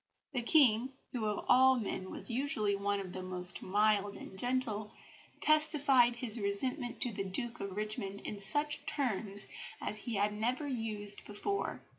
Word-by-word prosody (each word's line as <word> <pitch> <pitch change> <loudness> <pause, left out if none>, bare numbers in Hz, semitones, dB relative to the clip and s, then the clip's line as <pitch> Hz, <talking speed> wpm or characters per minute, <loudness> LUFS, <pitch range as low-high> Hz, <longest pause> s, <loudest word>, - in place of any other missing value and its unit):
The 255 -4 -1
King, 250 -1 +4 0.2
who 235 -4 -3
of 210 -1 -2
all 260 +1 +6
men 190 -3 -4
was - - -4
usually 230 -5 0
one 200 0 -1
of 185 -2 -7
the 185 - -5
most 180 -1 -1
mild 205 +1 +1
and - - -10
gentle, 220 -2 0 0.5
testified 285 -6 +4
his 235 -1 -1
resentment 240 +5 -1
to 245 - +3
the 195 -2 -3
Duke 235 +5 +1
of 195 0 -6
Richmond 210 -2 -4
in 205 - -6
such 290 +9 +1
terms 210 -7 -2 0.3
as 215 - -1
he 230 +1 -4
had 205 +1 +1
never 240 +7 -1
used 215 -5 0
before. 215 - -3
215 Hz, 160 wpm, -33 LUFS, 200-255 Hz, 0.5 s, all